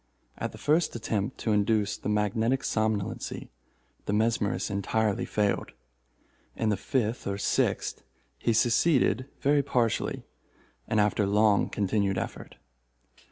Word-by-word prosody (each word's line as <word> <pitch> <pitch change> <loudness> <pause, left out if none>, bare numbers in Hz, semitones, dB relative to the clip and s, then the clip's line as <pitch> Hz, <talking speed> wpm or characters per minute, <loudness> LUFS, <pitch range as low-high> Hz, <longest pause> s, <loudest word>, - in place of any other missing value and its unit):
At - - -4
the - - -11
first 155 0 +1
attempt 110 0 -2
to 110 - 0
induce 105 0 +2
the - - -5
magnetic 110 +5 +1
somnolency, 110 -3 -2 0.6
the 100 - 0
mesmerist 110 -1 0
entirely 105 +1 0
failed. 105 -1 -1 0.8
In 110 - 0
the 105 - +2
fifth 115 +2 -2
or 100 0 -2
sixth 100 - 0 0.4
he 115 - +1
succeeded 120 - +3
very 145 +1 +3
partially, 120 -5 -1 0.6
and 110 - +1
after 105 -1 +2
long 105 0 +3
continued 100 -1 0
effort. - - -5
110 Hz, 120 wpm, -28 LUFS, 100-115 Hz, 0.8 s, succeeded